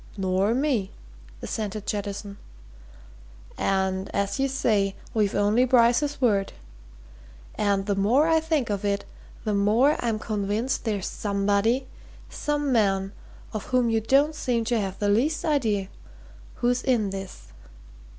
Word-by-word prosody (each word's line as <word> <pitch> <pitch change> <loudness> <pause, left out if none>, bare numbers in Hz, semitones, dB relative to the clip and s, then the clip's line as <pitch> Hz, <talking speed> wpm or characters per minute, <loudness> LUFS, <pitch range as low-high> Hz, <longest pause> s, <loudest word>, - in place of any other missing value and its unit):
"Nor 190 +3 +1
me," 255 -8 0 0.5
assented 210 -1 -4
Jettison. 200 0 -4 1.2
"And 190 0 -1
as 200 +6 -1
you 270 - +2
say, 210 -7 +1 0.2
we've 210 -3 +1
only 205 +4 +3
Bryce's 255 +3 +3
word. 205 -6 +1 1.0
And, 200 -1 0
the 205 - 0
more 235 +10 +3
I 325 -1 +4
think 315 -8 -1
of 200 0 -2
it, 200 0 -1 0.4
the 215 - -1
more 220 +9 +3
I'm 230 -2 0
convinced 215 +4 -2
there's 205 -4 -1
somebody 205 +5 0 0.5
some 295 -1 -1
man 195 -4 +1 0.4
of 215 - -4
whom 250 -2 +1
you 225 0 +1
don't 275 +7 +3
seem 240 -6 -1
to 235 0 +1
have 195 -1 -4
the 205 - -1
least 255 +10 +1
idea 225 - +1 0.7
who's 245 0 +1
in 230 -7 +1
this. 195 -1 -8
215 Hz, 130 wpm, -25 LUFS, 200-255 Hz, 1.2 s, I